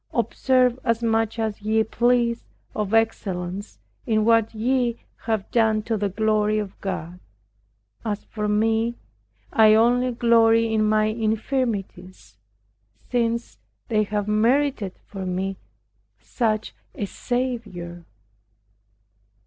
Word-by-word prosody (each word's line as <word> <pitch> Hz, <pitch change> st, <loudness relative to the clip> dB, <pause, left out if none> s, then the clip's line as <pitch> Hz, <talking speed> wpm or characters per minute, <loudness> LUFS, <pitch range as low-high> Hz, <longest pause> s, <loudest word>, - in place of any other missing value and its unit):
Observe 255 Hz, -1 st, +2 dB
as 230 Hz, -1 st, 0 dB
much 225 Hz, 0 st, +1 dB
as 220 Hz, -2 st, -2 dB
ye 220 Hz, +1 st, +2 dB
please 235 Hz, +1 st, +1 dB, 0.3 s
of 210 Hz, -2 st, -2 dB
excellence 200 Hz, -4 st, -1 dB, 0.3 s
in 215 Hz, -2 st, +2 dB
what 225 Hz, -1 st, +4 dB
ye 240 Hz, +1 st, 0 dB, 0.3 s
have 220 Hz, -3 st, -1 dB
done 220 Hz, -2 st, +2 dB
to 225 Hz, +1 st, -1 dB
the 205 Hz, -1 st, -1 dB
glory 215 Hz, +1 st, +1 dB
of 205 Hz, -2 st, -5 dB
God. 180 Hz, -2 st, -5 dB, 0.8 s
As 210 Hz, -2 st, -3 dB
for 210 Hz, -1 st, -4 dB
me, 225 Hz, +2 st, +1 dB, 0.6 s
I 215 Hz, -1 st, +6 dB
only 245 Hz, +3 st, +3 dB
glory 230 Hz, -1 st, +4 dB
in 215 Hz, -1 st, +2 dB
my 215 Hz, 0 st, +3 dB
infirmities, 215 Hz, -, -2 dB, 0.8 s
since 235 Hz, -1 st, -1 dB, 0.3 s
they 215 Hz, -2 st, +2 dB
have 205 Hz, 0 st, -2 dB
merited 230 Hz, -1 st, +1 dB
for 195 Hz, -2 st, -7 dB
me 185 Hz, +1 st, -2 dB, 0.6 s
such 220 Hz, -3 st, -2 dB, 0.2 s
a 205 Hz, -, -2 dB
Saviour! 220 Hz, -8 st, -4 dB
220 Hz, 110 wpm, -23 LUFS, 210-235 Hz, 0.8 s, I